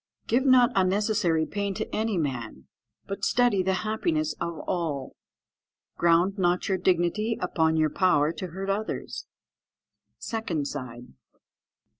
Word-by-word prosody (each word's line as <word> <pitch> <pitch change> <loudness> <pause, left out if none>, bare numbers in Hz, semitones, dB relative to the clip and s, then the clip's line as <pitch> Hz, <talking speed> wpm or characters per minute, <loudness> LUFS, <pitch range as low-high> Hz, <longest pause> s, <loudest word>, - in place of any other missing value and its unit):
"Give 260 +4 +1
not 255 -2 +6
unnecessary 190 -3 +2
pain 200 +1 -3
to - - -3
any 220 -2 0
man, 120 - -3 0.4
but 195 - -6
study 240 -6 +3
the 190 +1 +1
happiness 155 -8 0
of 170 -1 -3
all. 155 -7 -3 0.8
"Ground 175 +4 +3
not 175 0 +1
your 190 -1 0
dignity 185 +6 +1
upon 160 -3 +1
your 155 -1 +2
power 155 -5 +3
to 170 +3 -6
hurt 190 +3 -3
others." 210 +2 -4 0.9
_Second 185 - -3
side. 125 -4 -7
180 Hz, 125 wpm, -26 LUFS, 160-205 Hz, 0.9 s, not